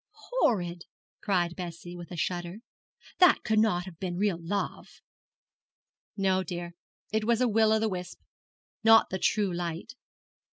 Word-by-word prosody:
'Horrid!' 180 - 0 0.4
cried 175 -4 0
Bess, 175 -2 -7
with 175 -1 -8
a 175 - -7
shudder. 175 +2 -3 0.6
'That 360 0 +6
could 215 -1 +2
not 180 -5 +2
have 175 -4 -11
been 180 -2 -3
real 195 -3 +1
love.' 200 +5 -4 1.2
'No, 190 -1 +2
dear, 175 -1 -5 0.4
it 220 0 0
was 235 +1 +2
a 250 - +3
will 220 -1 +3
o' 220 - +4
the 220 0 +1
wisp, 180 -3 -5 0.6
not 225 0 +6
the 190 - -2
true 200 0 +1
light.' 170 -1 -4
185 Hz, 150 wpm, -28 LUFS, 175-215 Hz, 1.2 s, That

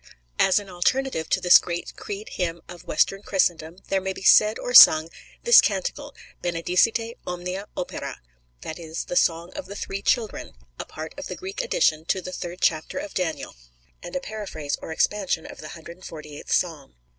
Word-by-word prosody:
As 190 - +4
an 205 -1 -2
alternative 185 0 -1
to 185 - +2
this 180 -1 +7
great 175 0 -5
Creed 430 0 -7
hymn 170 - -3
of 175 -1 -12
Western 195 0 +1
Christendom 175 -4 0
there 195 -1 +1
may 190 0 -3
be 190 - -10
said 215 +2 +6
or 245 - -5
sung 160 -8 +9 0.3
"this 475 - +8
canticle, - - -3 0.3
Benedicite, 180 +7 0
omnia 180 +3 -5
opera," 180 - -5 0.4
that 160 - -7
is, 165 -1 -6
the - - -5
Song 170 +1 +1
of 290 - -7
the 200 - -8
Three 195 -1 -5
Children, 220 - -1 0.3
a - - -4
part 155 +1 -8
of 285 - -6
the - - -6
Greek 385 +5 -5
addition 475 - +1
to 190 - 0
the 185 0 -7
third 175 0 -6
chapter 160 - 0
of 300 +1 -5
Daniel, 175 -4 -3 0.5
and 175 - -9
a - - +1
paraphrase 205 - -5
or - - -7
expansion 185 -1 0
of - - -11
the 155 - -8
148th 160 -3 -10
Psalm. 160 - -1
180 Hz, 180 wpm, -24 LUFS, 165-215 Hz, 0.5 s, sung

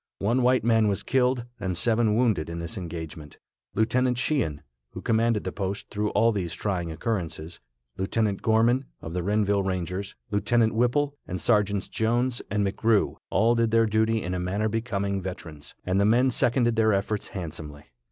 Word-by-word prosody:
One 115 +6 +1
white 125 +1 +3
man 115 -1 +3
was 100 -2 -1
killed 125 -1 +1
and 95 -3 -2
seven 110 +1 +2
wounded 110 -10 +1
in 85 - -5
this 85 -1 -5
engagement. 80 -4 -7 0.4
Lieutenant 125 +3 +2
Sheehan, 120 - -1 0.3
who - - -6
commanded 115 -1 +2
the - - -3
post 100 0 -4
through 105 0 -1
all 115 +1 +4
these 90 -6 -3
trying 90 -5 -2
occurrences, 85 -3 -3 0.4
Lieutenant 100 +1 0
Gorman, 115 +4 +3
of 80 - -7
the 90 - -1
Renville 100 +1 +1
Rangers, 95 +1 -3 0.2
Lieutenant 110 +2 +2
Whipple, 125 +5 +1
and 90 - -4
Sergeants 105 -3 +2
Jones 120 +2 0
and 105 0 0
McGrew, 105 +2 +1
all 115 +2 +3
did 115 -1 +2
their 115 0 +4
duty 110 0 +1
in 90 - -3
a 90 - -2
manner 95 +4 -1
becoming 100 -3 -2
veterans, 80 -5 -8
and 95 +2 +1
the - - +3
men 125 +5 +4
seconded 120 -1 +2
their 110 -1 +4
efforts 100 +2 -1
handsomely. 80 -5 -7
105 Hz, 170 wpm, -26 LUFS, 95-115 Hz, 0.4 s, all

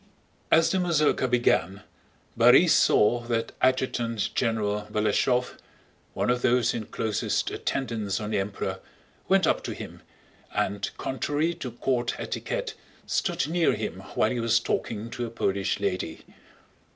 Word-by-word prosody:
As 165 0 +4
the 190 - +1
mazurka 155 -6 +2
began, 105 -6 +1 0.5
Borís - - +6
saw 105 +3 +4
that 115 -1 -1
Adjutant 120 -4 0
General 105 -3 -1
Balashëv, 125 +4 +1 0.6
one - - +1
of 125 0 0
those 125 0 +3
in 110 -3 -4
closest 110 -2 -1
attendance 110 -7 -2
on 105 0 -4
the 105 - +1
Emperor, 100 +1 -3 0.5
went - - +4
up - - +2
to - - -4
him - - -9 0.5
and 100 0 -1
contrary 145 +5 -1
to 165 -7 -6
court 120 0 -1
etiquette - - -3 0.3
stood - - 0
near 170 +1 +2
him 105 -4 -4 0.2
while 110 - +2
he 125 - -2
was 115 0 +3
talking 115 -1 -3
to 120 -1 -3
a - - -7
Polish 100 -4 -1
lady. 95 -5 -3
115 Hz, 140 wpm, -26 LUFS, 105-130 Hz, 0.6 s, Borís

